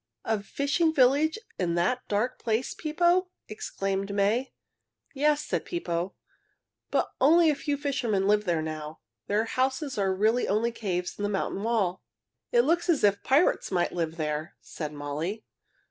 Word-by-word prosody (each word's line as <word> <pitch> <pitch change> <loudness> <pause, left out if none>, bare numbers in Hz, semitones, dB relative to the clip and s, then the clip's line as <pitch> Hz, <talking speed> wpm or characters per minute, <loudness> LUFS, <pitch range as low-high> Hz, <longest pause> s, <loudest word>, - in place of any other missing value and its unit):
A 220 -2 0
fishing 280 - +1
village 290 - +3 0.2
in 170 -2 0
that 190 +9 0
dark 215 +5 -1
place, 230 +2 -1
Pippo?" 345 +4 +2 0.2
exclaimed 195 -2 -3
May. 215 +6 +1 0.6
"Yes," 295 +1 +2
said - - -1
Pippo, 185 - -3 0.7
"but - - 0
only 320 +4 +6
a - - -1
few 285 0 -2
fishermen 240 -9 0
live 210 0 +3
there 170 -3 0
now. 155 0 -6 0.3
Their 210 +2 +1
houses 260 +1 -1
are 195 -1 +2
really 215 +6 +2
only 220 +4 +1
caves 185 -6 -3
in - - -4
the 205 - 0
mountain 195 -1 -2
wall." 210 -5 0 0.5
"It 480 -1 +5
looks 345 -2 +1
as 320 -5 +3
if 205 -1 +3
pirates 285 +7 +2
might 180 -2 +1
live 165 -1 -2
there," 155 0 -3
said 150 -2 -6
Molly. 150 +9 -4
215 Hz, 155 wpm, -27 LUFS, 185-280 Hz, 0.7 s, only